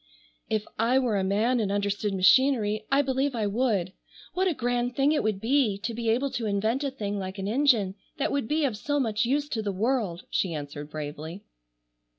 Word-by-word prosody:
"If 215 -1 0
I 235 +3 +3
were 245 -5 +1
a 190 - 0
man 215 +6 +2
and 205 -3 0
understood 205 +1 -1
machinery 215 +1 +3
I 280 +1 +4
believe 265 0 0
I 220 -2 0
would. 205 -4 0 0.4
What 375 +1 +1
a 345 - 0
grand 245 0 -1
thing 275 +2 +3
it 310 - +2
would 215 -2 -1
be 230 -2 +2
to 230 +3 -4
be 230 0 -2
able 260 +5 +1
to 230 -2 -2
invent 220 +7 0
a 280 - 0
thing 205 -6 -4
like 190 +1 -5
an 195 0 -3
engine 230 -5 +3 0.2
that 280 - 0
would 280 -5 -1
be 305 +2 +1
of 250 -6 -1
so 290 +7 -1
much 225 -3 +1
use 285 +4 0
to 225 - -2
the 205 -2 -2
world," 205 -3 -1
she 175 -4 0
answered 145 0 -6
bravely. 155 +4 -6
220 Hz, 205 wpm, -27 LUFS, 200-265 Hz, 0.4 s, I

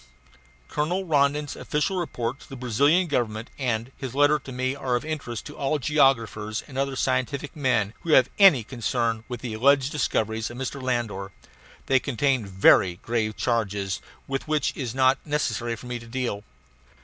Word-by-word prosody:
Colonel 175 +6 -1
Rondon's 145 -2 +1
official 150 +6 -1
report 140 -7 -3
to - - -16
the 135 - -7
Brazilian 140 +8 +3
Government 115 -7 -2
and 120 -2 -1
his 130 -2 -6
letter 145 +1 +4
to 135 - -10
me 130 +1 -1
are 130 -3 -1
of 120 - -2
interest 140 -8 -4
to 150 - -9
all 140 +2 0
geographers 120 -7 +1
and 135 - -12
other 135 0 -1
scientific 130 +2 -1
men 120 -8 +1
who 165 - 0
have 130 -3 +7
any 185 - +7
concern 115 -1 -1
with 125 -2 -6
the 120 -3 -4
alleged 135 +4 +3
discoveries 110 -6 -1
of 120 - -9
Mr. 135 +1 -4
Landor. 115 -6 -2 0.5
They 135 -1 +4
contain 130 -3 0
very 95 -1 +5
grave 110 -2 -1
charges, 100 -5 -1 0.3
with 135 +2 -3
which 155 -2 +1
it - - -17
is 125 -4 -4
not 130 0 +4
necessary 145 -6 -1
for 115 - -12
me 125 -1 -4
to 115 - -13
deal. 115 -4 -3
130 Hz, 175 wpm, -25 LUFS, 115-140 Hz, 0.5 s, have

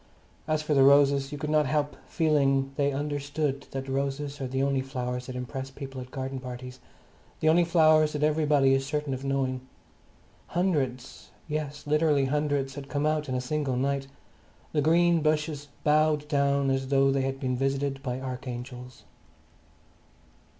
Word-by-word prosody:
As 155 0 0
for 150 - 0
the 135 - +4
roses, 140 0 +5
you 145 - -5
could 150 0 -3
not 150 -2 +3
help 145 +1 0
feeling 135 -4 +2
they 140 0 +1
understood 145 0 -2
that 135 0 -5
roses 140 +1 -2
are 135 - -2
the 130 +1 -1
only 140 -1 +1
flowers 125 -2 -4
that 130 - -6
impress 130 +1 -5
people 135 -1 -8
at 125 - -9
garden 135 0 -4
parties; 125 0 -8 0.6
the 155 - 0
only 170 +2 +5
flowers 155 -2 +4
that 150 0 -2
everybody 150 -3 +3
is 135 0 +2
certain 150 0 -2
of 130 +1 -5
knowing. 135 -2 -1 0.9
Hundreds, 145 -9 -2 0.2
yes, 150 -1 -4
literally 150 -2 +2
hundreds, 145 -1 0
had 140 0 -8
come 145 0 -1
out 155 -1 0
in 130 - -1
a - - 0
single 140 0 -1
night; 135 +1 -1 0.6
the 150 - +1
green 170 +2 +4
bushes 150 -1 0 0.2
bowed 150 0 +3
down 140 -2 +2
as 135 0 -1
though 135 0 +3
they 135 0 +1
had 135 0 -2
been 130 -2 -1
visited 135 +1 -1
by 125 -2 -3
archangels. 125 -1 -7
140 Hz, 165 wpm, -27 LUFS, 135-150 Hz, 0.9 s, roses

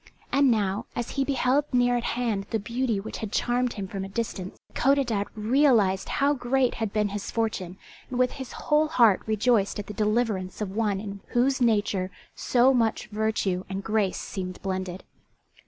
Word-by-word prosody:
And 280 0 +4
now, 205 -4 0
as 240 - -3
he 275 - 0
beheld 275 +1 +2
near 245 -1 +3
at 240 - -1
hand 215 -5 -1
the 225 - 0
beauty 235 0 -1
which 220 +3 -6
had 215 -3 -5
charmed 245 +1 +1
him 195 -2 -5
from 195 0 -5
a 195 - -6
distance, 195 -3 -4 0.2
Codadad 245 -6 +2
realized 220 -4 +3
how 285 +1 +2
great 255 -1 +1
had 220 -3 -3
been 210 -1 +1
his 205 0 -5
fortune, 190 -5 -2 0.3
and 250 - -4
with 250 0 +3
his 265 -2 -7
whole 305 +1 +1
heart 230 - +4
rejoiced 215 -1 +2
at 205 - -4
the 210 - -7
deliverance 210 -3 0
of 210 -3 -3
one 210 -3 +1
in 200 -1 -6
whose 260 +2 +1
nature 205 -5 +2 0.2
so 255 +2 +3
much 230 -3 0
virtue 210 -4 -1
and 195 +1 -4
grace 210 -3 0
seemed 185 -2 -5
blended. 185 -1 -3
220 Hz, 175 wpm, -26 LUFS, 195-250 Hz, 0.3 s, And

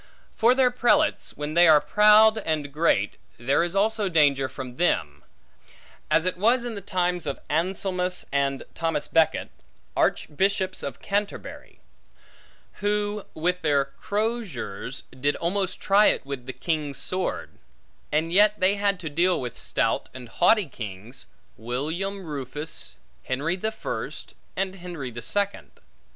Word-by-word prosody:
For 235 +3 +4
their 255 -2 +4
prelates; 270 +5 +1
when 150 +1 -4
they 175 +1 +6
are 155 -2 +8
proud 215 +4 +6
and 155 -7 -2
great, 145 -10 +1 0.2
there 135 +7 +2
is 175 +2 -3
also 210 0 +2
danger 140 -5 +3
from 130 -1 -8
them; 75 - 0 0.9
as 165 - +3
it 185 0 0
was 235 +5 +3
in 240 - -3
the 200 - -5
times 180 -3 -1
of 140 - -3
Anselmus, 180 +2 0
and 140 -1 0
Thomas 165 -3 -1
Becket, 165 -1 +2 0.4
Archbishops 190 +3 0
of 140 - -6
Canterbury; 200 0 -4 1.0
who, 205 0 -1
with 180 +3 0
their 145 -4 +2
croziers, 185 - -4 0.2
did 145 +2 +1
almost 185 +2 -1
try 205 +2 +5
it - - +1
with 135 -3 -6
the - - -3
king's 150 -4 -2
sword; 185 0 -2 0.5
and 160 +3 0
yet 210 +2 +5
they 195 +2 +3
had 200 -2 +1
to 165 - -5
deal 175 +4 +2
with 125 -3 -6
stout - - 0
and 125 -2 -9
haughty 205 - +4
kings, 110 - -8 0.3
William 160 - -3
Rufus, 150 +1 -6 0.3
Henry 145 +7 -1
the 215 +4 -2
First, 220 - -6 0.2
and 195 0 -2
Henry 170 -8 -6
the 120 +1 -7
Second. 200 - -2
175 Hz, 140 wpm, -25 LUFS, 140-200 Hz, 1.0 s, are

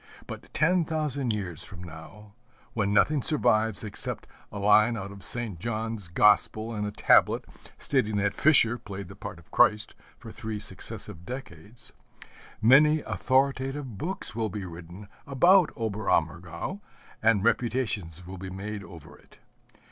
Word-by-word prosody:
But - - -10
ten 175 +3 +2
thousand 150 -5 -2
years 90 -7 -1
from 90 -3 -6
now, 90 +6 -12 0.4
when 100 -3 0
nothing 140 +8 +3
survives 110 -8 +1
except 105 -2 -1 0.3
a 105 - -7
line 105 +3 +4
out 100 -1 -6
of 100 -1 -12
St. 115 -7 -5
John's 110 -1 -4
Gospel 105 +5 +3
and 105 -1 -2
a - - -4
tablet 105 - +3 0.3
stating 110 -7 0
that 100 0 +1
Fischer 120 -3 +5
played 100 -2 -8
the 95 - -11
part 105 -2 -8
of 85 - -19
Christ 105 0 +3 0.2
for - - -11
three 110 -1 -5
successive 85 -4 -4
decades, 110 -2 -10 0.7
many 150 +6 +6
authoritative 135 -3 -1
books 180 - -3
will 110 -1 -1
be 100 0 -6
written 85 +3 -10 0.2
about 175 +6 +5
Oberammergau, 90 - -2 0.4
and 110 -3 +3
reputations 110 -7 -1
will 95 +1 -9
be 95 0 -6
made 100 +2 -6
over 85 -6 -13
it. - - -22
105 Hz, 140 wpm, -27 LUFS, 95-125 Hz, 0.7 s, many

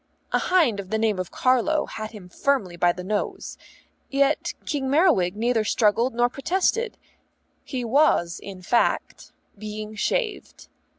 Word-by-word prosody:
A - - +2
hind 315 - +2
of 190 -2 -7
the 220 - 0
name 215 -3 +1
of 185 - -3
Carlo 260 +5 +2
had 215 -1 -6
him 210 -5 -11
firmly 200 -3 -1
by 175 +1 +3
the 180 +1 -7
nose. 205 +2 -3 0.5
Yet 275 +2 +1
King 275 -3 -2
Merriwig 275 - +3
neither 230 +1 +1
struggled 230 +3 +2
nor 240 +1 +3
protested; 380 - -1 0.7
he 250 -3 -4
was, 230 - +2
in 190 -2 -9
fact, 235 +6 0 0.2
being 215 +1 -7
shaved. 435 - -3
230 Hz, 140 wpm, -24 LUFS, 205-280 Hz, 0.7 s, by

